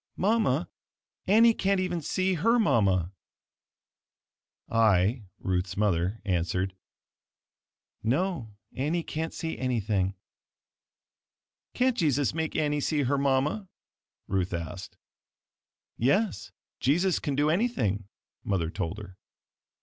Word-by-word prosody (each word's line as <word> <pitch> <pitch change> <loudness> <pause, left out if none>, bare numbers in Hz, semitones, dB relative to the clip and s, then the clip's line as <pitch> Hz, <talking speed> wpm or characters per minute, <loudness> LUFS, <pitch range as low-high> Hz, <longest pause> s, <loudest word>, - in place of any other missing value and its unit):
Mama, 190 - +2 0.6
Annie 225 +4 +6
can't 195 -2 +1
even 180 -2 -1
see 185 +5 0
her 225 +8 +3
mama!" 95 - +2 1.5
I 110 0 +3
(Ruth's 90 -1 -2
mother) 100 0 +1
answered, 90 0 0 1.3
"No, 130 - -1 0.2
Annie 155 +6 -1
can't 160 +1 -3
see 165 -1 -5
anything." 105 -7 0 1.6
"Can't 255 -1 +2
Jesus 145 - +1
make 160 -1 -2
Annie 150 -1 +1
see 150 0 +1
her 135 +2 +1
mama?" 140 +8 +1 0.6
Ruth 95 -2 -1
asked. 85 +3 -7 1.0
"Yes, 185 - +1 0.3
Jesus 175 +8 +2
can 145 -3 -2
do 145 +2 +2
anything," 120 - 0 0.4
Mother 85 -5 -1
told 85 +2 -3
her. 100 -3 -10
130 Hz, 100 wpm, -28 LUFS, -, 1.6 s, Annie